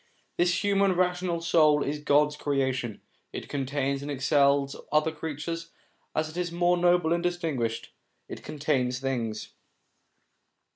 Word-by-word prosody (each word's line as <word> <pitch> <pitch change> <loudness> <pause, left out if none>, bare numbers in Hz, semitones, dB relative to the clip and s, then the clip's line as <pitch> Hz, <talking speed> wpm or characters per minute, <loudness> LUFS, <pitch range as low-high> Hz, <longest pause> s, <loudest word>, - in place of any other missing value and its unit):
This 175 +3 +1
human 200 -1 +3
rational 180 -1 0
soul 155 -3 +4
is 150 +1 -3
God's 150 0 +3
creation; 130 -6 -1 0.3
it - - -6
contains 140 0 -2
and 145 - -6
excels 140 0 +2 0.2
other 155 +1 +3
creatures; 160 +2 -5 0.5
as 155 0 +1
it 155 +2 -10
is 175 -1 -2
more 175 +1 +2
noble 175 -1 +3
and 170 - 0
distinguished, 160 -10 -2 0.4
it - - -8
contains 135 -4 -1
things. 120 -5 -3
150 Hz, 130 wpm, -27 LUFS, 140-175 Hz, 0.5 s, soul